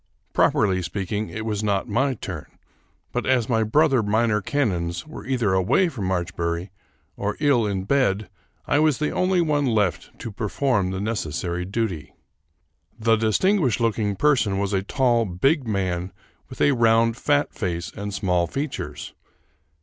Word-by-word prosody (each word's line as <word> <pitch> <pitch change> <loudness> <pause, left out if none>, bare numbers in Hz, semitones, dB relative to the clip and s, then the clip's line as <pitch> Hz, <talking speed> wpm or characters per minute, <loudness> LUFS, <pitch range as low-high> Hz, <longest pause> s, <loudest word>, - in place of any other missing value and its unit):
Properly 95 -2 +2
speaking, 100 +4 -3
it 110 0 -5
was 105 -1 -2
not 100 -2 0
my 135 +2 +1
turn; 90 -8 -7 0.6
but, - - -2
as 125 -4 +2
my 115 -3 +2
brother 135 +3 +3
minor 110 +1 +1
canons 90 - -1
were 155 - -10
either 120 -7 +1
away 95 - +3
from 115 - -5
Marchbury 85 0 -2 0.4
or 105 +1 -3
ill 140 -7 +3
in 95 -2 -2
bed, 105 -4 +1 0.4
I 145 - +2
was 155 -3 +3
the 150 - -1
only 185 -1 +2
one 145 -4 +1
left 105 -7 0
to 115 - -6
perform 105 -1 0
the 95 0 -3
necessary 90 -4 -2
duty. 95 -5 -3 0.8
The 115 0 +3
distinguished 125 - +2
looking 110 -3 0
person 125 -7 +2
was 100 0 -1
a 95 - +2
tall, 120 +2 +2
big 130 - +1
man 95 -3 -1 0.4
with 130 - -8
a 145 - +5
round 115 -2 +3
fat 145 +3 +1
face 90 - -3
and 100 0 -5
small 90 -4 0
features. 140 - -5
110 Hz, 150 wpm, -23 LUFS, 95-130 Hz, 0.8 s, a